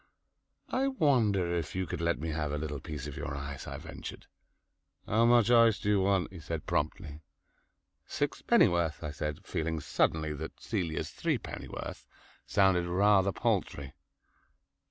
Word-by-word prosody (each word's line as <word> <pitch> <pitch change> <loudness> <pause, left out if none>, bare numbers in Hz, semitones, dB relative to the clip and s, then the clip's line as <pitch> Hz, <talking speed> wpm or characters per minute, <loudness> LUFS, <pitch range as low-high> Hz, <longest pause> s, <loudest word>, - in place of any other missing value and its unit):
"I 265 +1 +1
wonder 115 - +2
if 85 -1 -3
you 95 0 0
could - - -5
let 85 0 +1
me 80 +2 -4
have 75 -1 -2
a 75 - -1
little 75 -1 -4
piece 75 -1 -6
of 75 -2 -6
your 70 - -4
ice," 70 0 -6
I - - -5
ventured. - - -8 0.8
"How 115 +3 +3
much 120 -1 +5
ice 115 -2 +6
do 105 - -2
you 100 -2 +4
want?" 95 -1 +1
he 90 - -8
said 80 0 -5
promptly. 75 0 -2 0.9
"Sixpennyworth," 85 -3 +2
I 75 - -3
said, 75 +1 -4
feeling 80 0 -2
suddenly 80 +1 0
that 80 +2 -7
Celia's 90 -8 -2
threepennyworth - - -4 0.4
sounded 95 -3 +3
rather 100 +2 +4
paltry. 70 -5 -1
85 Hz, 145 wpm, -31 LUFS, 75-100 Hz, 0.9 s, ice